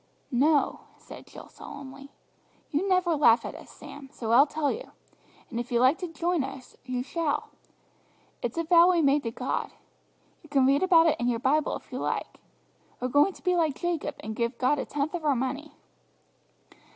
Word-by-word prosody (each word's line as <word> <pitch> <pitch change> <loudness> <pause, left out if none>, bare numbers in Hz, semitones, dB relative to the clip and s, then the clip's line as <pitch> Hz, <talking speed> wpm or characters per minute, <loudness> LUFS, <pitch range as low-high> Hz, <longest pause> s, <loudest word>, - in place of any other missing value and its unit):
"No," 285 +4 +2 0.2
said - - -13
Jill - - -12
solemnly; 275 0 -11 0.6
"you 345 +6 0
never 365 -3 +2
laugh 235 -5 +4
at - - -5
us, - - -12
Sam, 280 -2 -12
so 225 -2 -4
I'll 270 +5 +6
tell 295 -1 -1
you; - - -7 0.6
and 235 - -3
if 240 +2 -6
you 235 - +2
like 260 +7 +4
to 360 - -4
join 335 -1 -1
us 265 -1 -9
you 250 -1 -3
shall. 315 +1 -2 0.9
It's - - -4
a 335 - +1
vow 340 +2 +6
we've 345 -3 +3
made 280 +1 +3
to 230 - -3
God. 250 +3 -3 0.7
You 315 - -18
can 275 -2 +3
read 275 +2 +3
about 345 -3 +5
it 320 -2 +2
in 240 - 0
your 235 - 0
Bible 280 +6 +1
if - - -11
you - - -4
like. - - -3 0.6
We're 250 - -2
going 290 +9 +3
to - - -17
be 360 0 +2
like 320 -5 +1
Jacob, 345 -3 -2
and 220 0 -6
give 235 +1 -2
God 275 +3 +1
a - - -3
tenth 290 +2 -2
of 345 -2 -4
our 290 -3 +2
money." 275 +4 -3
285 Hz, 195 wpm, -27 LUFS, 255-330 Hz, 0.9 s, I'll